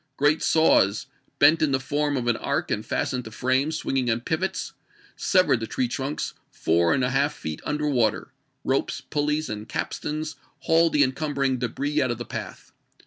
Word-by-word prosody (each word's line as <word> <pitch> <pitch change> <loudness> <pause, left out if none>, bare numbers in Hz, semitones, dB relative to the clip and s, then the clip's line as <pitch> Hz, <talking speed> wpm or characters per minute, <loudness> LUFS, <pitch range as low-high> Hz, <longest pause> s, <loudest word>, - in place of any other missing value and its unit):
Great 145 +2 +3
saws, 110 -10 +3 0.3
bent 155 +3 +5
in 150 -3 +2
the 130 - +2
form 145 +2 -1
of 125 - -2
an 120 -1 +2
arc - - -2
and - - -1
fastened 125 -1 -2
to 110 - -8
frames 130 +7 0
swing 135 - -2
ing 125 -2 +1
on 115 0 +1
pivots, 160 +9 -2 0.4
severed 185 - +3
the 115 - -4
tree 125 - -1
trunks 135 +4 -3 0.2
four 85 +1 +1
and 130 - +2
a 125 - +1
half 140 +3 +1
feet 80 -1 -6
under 150 0 -1
water; 120 -7 0 0.3
ropes, - - 0
puUeys, 150 +1 0
and 105 0 -6
capstans 155 -1 -4 0.2
hauled 165 0 +3
the 145 - +5
encumbering 135 -1 0
debris 140 +5 -1
out 130 - +1
of 120 - -2
the 120 - -6
path. - - -7
135 Hz, 185 wpm, -25 LUFS, 120-150 Hz, 0.4 s, bent